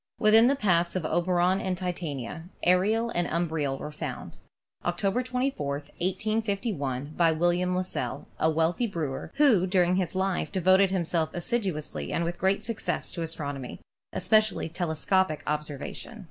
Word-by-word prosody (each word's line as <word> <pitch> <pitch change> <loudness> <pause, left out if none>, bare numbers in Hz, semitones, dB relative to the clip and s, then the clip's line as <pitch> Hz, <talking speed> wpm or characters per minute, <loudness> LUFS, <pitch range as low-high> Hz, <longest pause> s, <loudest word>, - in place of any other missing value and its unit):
Within 220 +1 +6
the 275 - +3
paths 175 -8 +1
of 180 -4 -1
Oberon 180 +2 +2
and 185 -1 -1
Titania, 160 -5 -4 0.2
Ariel 215 +6 +3
and 175 0 0
Um 170 +1 0
briel 145 -4 -1
were 150 - -6
found, 150 - -6 0.4
October 195 +6 0
24, 250 - -1
1851, 185 - -2
by 170 -2 +4
William 175 +3 +1
Lassell, 185 0 -3
a 160 - +3
wealthy 165 +8 +1
brewer, 155 -9 -4
who 245 -11 +4
during 180 -1 +3
his 185 -1 -1
life 190 -5 0
devoted 190 +1 +4
himself 170 -3 0
assiduously 175 - -2
and 170 - 0
with 170 +1 -3
great 190 +2 +1
success 225 -1 -2
to 170 - -5
astronomy, 145 -5 -4 0.3
espe 215 - +4
cially 205 -6 -3
telescopic 175 0 +1
observation. 150 - -4
175 Hz, 145 wpm, -27 LUFS, 160-195 Hz, 0.4 s, Within